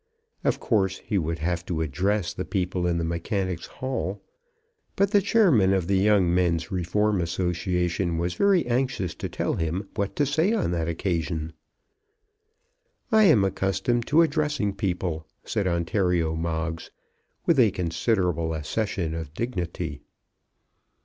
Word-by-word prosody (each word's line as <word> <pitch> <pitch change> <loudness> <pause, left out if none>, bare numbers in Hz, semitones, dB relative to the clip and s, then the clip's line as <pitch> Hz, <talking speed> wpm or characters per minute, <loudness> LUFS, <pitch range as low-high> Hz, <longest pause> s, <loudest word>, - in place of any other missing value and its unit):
Of - - +1
course 95 -4 +1
he 105 -3 -1
would 80 0 -2
have 85 +2 -2
to 80 -3 -1
address 90 +6 0
the 90 - -4
people 90 0 -1
in 85 -1 +1
the 85 - -1
Mechanics' 85 +1 -2
Hall; 120 -7 -3 0.8
but 200 0 +2
the 205 -2 +5
chairman 170 - +4
of 95 -3 +1
the 95 +1 +2
Young 100 -3 +3
Men's 85 -1 +1
Reform 95 +2 +1
Association 90 0 -1
was 85 +1 -1
very 200 -3 +3
anxious 120 -7 -1
to - - -5
tell - - -1
him 85 +5 -2
what 100 -2 -2
to 145 - +2
say 160 - +2
on 220 - 0
that 85 -2 -1
occasion. 80 -2 -2 1.6
"I 220 -1 +6
am 130 - +6
accustomed 95 +5 0
to 160 +4 +5
addressing 150 -9 0
people," 90 -5 -2 0.2
said 100 - -1
Ontario 85 -2 +1
Moggs, 80 0 -3 0.6
with 165 -5 +3
a 115 -4 +6
considerable 90 -2 0
accession 85 +1 -2
of 80 -2 -6
dignity. 90 -8 -3
95 Hz, 140 wpm, -25 LUFS, 85-105 Hz, 1.6 s, I